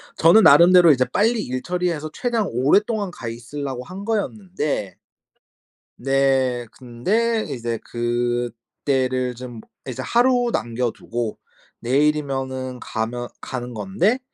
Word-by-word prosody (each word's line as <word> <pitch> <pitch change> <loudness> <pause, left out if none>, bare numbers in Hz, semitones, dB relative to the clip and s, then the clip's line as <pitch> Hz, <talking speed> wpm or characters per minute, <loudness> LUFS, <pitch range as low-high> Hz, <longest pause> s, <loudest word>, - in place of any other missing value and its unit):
저는 170 +7 +6
나름대로 170 +3 +8
이제 130 -3 +3
빨리 220 - +1
일 130 +1 -4
처리해서 175 -3 -2
최대한 235 -5 -1
오랫동안 200 - +2
가 120 - -8
있으려고 125 +3 -5
한 190 +7 -9
거였는데 190 - -2 1.0
네 135 -2 +1
근데 215 - -1
이제 120 -4 -3
그때를 120 +2 -2
좀 120 -2 -9 0.3
이제 125 - -4
하루 245 0 +3
남겨 120 0 -1
두고 115 -1 -5 0.4
내일이면은 135 -1 -1
가면 120 +2 -4
가는 125 -1 -5
건데 195 - 0
135 Hz, 250 characters per minute, -22 LUFS, 120-185 Hz, 1.0 s, 나름대로